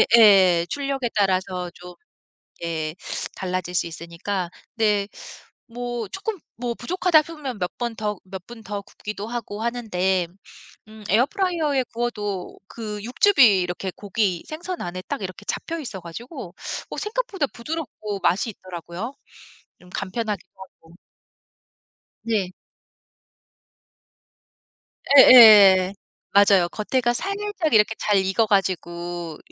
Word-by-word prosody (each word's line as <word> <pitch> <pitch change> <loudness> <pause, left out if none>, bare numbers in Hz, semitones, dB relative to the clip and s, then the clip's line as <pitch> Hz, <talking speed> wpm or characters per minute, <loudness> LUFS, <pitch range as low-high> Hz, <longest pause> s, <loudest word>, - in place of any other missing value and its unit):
예예. 190 -6 +6
출력에 275 -3 -2
따라서 185 -3 0
좀 180 0 -11 0.7
예 160 -2 -3 0.4
달라질 180 -1 -3
수 175 - +1
있으니까. 170 +3 -4 0.2
네 210 -3 +2 0.7
뭐 240 -2 -4
쪼끔 395 - -4 0.2
뭐 240 +1 -3
부족하다 335 +4 +3
하면 290 -8 -6
몇 180 - -1
번 240 -2 -2
더 210 -2 -3
몇 190 -1 -8
분 235 -1 -11
더 205 -1 -5
굽기도 210 +1 -7
하고 230 -3 -5
하는데 190 -7 0 0.6
음 215 0 -13
에어프라이어에 295 - +1
구워도 210 -6 -3
그 215 -2 -6
육즙이 245 - +5
이렇게 180 +1 -4
고기, 200 -3 -1
생선 345 +3 -5
안에 175 +1 -5
딱 - - -3
이렇게 185 -1 -7
잡혀 330 0 -3
있어 215 -10 -7
가지고 185 - -9 0.4
어 - - -5
생각보다 420 -7 -2
부드럽고 235 -7 -5
맛이 185 +6 +1
있더라고요 185 +5 -7 0.7
좀 180 - -17
간편하기도 210 +2 -3
하고. 180 -3 -15 1.3
네. 210 -5 -1 2.7
예예. 205 -7 +9 0.4
맞아요. 200 -3 +5
겉에가 240 +6 0
살짝 395 -1 -2
이렇게 220 0 +4
잘 210 - +1
익어 190 +4 +2
가지고 175 -4 -2
210 Hz, 250 characters per minute, -23 LUFS, 185-245 Hz, 2.7 s, 예예